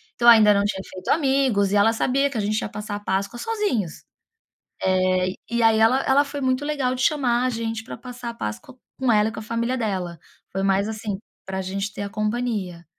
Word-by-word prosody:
então, 240 - +1
ainda 215 -3 +8
não 200 0 +2
tinha 205 -2 -2
feito 185 -1 -10
amigos, 265 -9 +2
e - - +1
ela 205 +2 +5
sabia 270 +4 +1
que 255 - -4
a - - +1
gente 215 +1 0
ia - - -4
passar 210 0 -5
a - - -4
páscoa 200 +3 -2
sozinhos. 405 - -2 0.8
Eh, 185 0 +2 0.2
e 235 0 0
aí 225 -1 +5
ela 240 +5 +4
ela 275 +2 +4
foi 285 0 -6
muito 260 +1 +1
legal 275 -4 0
de 255 - -4
chamar 255 -5 +2
a - - +2
gente 225 -1 -3
pra - - -8
passar 245 0 -7
a - - -5
páscoa 105 - -6 0.2
com 260 -2 +1
ela 210 -1 +4
e - - -8
com - - -6
a - - -9
família 235 +3 -1
dela, 190 -7 -2 0.4
foi 195 +1 -1
mais, 195 +1 +2
assim, 215 -2 -4 0.3
pra 190 0 -3
gente 195 +2 -3
ter 205 - -5
a 200 - -4
companhia. 210 -5 -2
220 Hz, 220 wpm, -23 LUFS, 200-250 Hz, 0.8 s, ainda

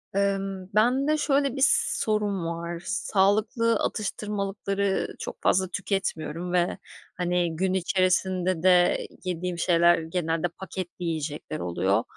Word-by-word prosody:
Imm, 195 -1 -1
bende 265 +7 +3
şöyle 280 -3 +1
bir 270 - +1 0.3
sorun 210 -4 0
var; 170 +1 -4
sağlıklı 215 +4 +2
atıştırmalıkları 200 -1 -2
çok - - -7
fazla 190 0 +3
tüketmiyorum 180 -3 -3
ve, 175 +1 +1 0.4
hani, 175 -2 0
gün 185 +3 0
içerisinde 185 -1 +1
de 180 -1 +4 0.2
yediğim 180 -1 -3
şeyler 170 0 +4
genelde 165 0 -1
paketli 180 0 -7
yiyecekler 155 -1 -3
oluyor. 90 +3 +1
185 Hz, 110 wpm, -26 LUFS, 170-200 Hz, 0.4 s, de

